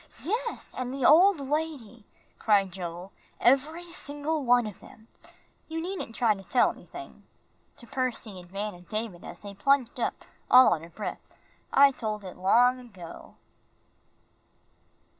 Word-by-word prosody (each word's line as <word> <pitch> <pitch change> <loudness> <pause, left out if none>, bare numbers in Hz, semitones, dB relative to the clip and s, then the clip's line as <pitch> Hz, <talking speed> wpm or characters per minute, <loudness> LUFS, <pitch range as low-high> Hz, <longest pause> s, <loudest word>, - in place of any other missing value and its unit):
"Yes, 460 +6 -3
and 255 -1 -3
the 270 -1 -2
old 360 +3 +7
lady," 275 -6 -4 0.3
cried 200 -3 +3
Joel. 175 +1 -7 0.3
"Every 290 +7 +3
single 300 -2 -3
one 245 -1 +4
of 210 -3 -7
them. 220 0 -16 0.6
You 320 0 -4
needn't 350 -9 -5
try 230 -2 +3
to 195 - -10
tell 195 +7 +2
anything," - - -11 0.6
to 245 - -11
Percy 235 -5 -3
and 175 -1 -14
Van 205 +2 -4
and 175 0 -16
David, 215 -5 -4
as 175 - -9
they 200 -1 -8
plunged 255 +4 +1
up, - - 0 0.3
all 255 -4 +8
out 160 - -3
of 170 0 -13
breath. 215 - -7 0.4
"I 280 0 +7
told 215 -5 -4
it 185 - -8
all - - -17
long 245 +6 +4
ago." 190 -9 -12
240 Hz, 150 wpm, -28 LUFS, 200-280 Hz, 0.6 s, all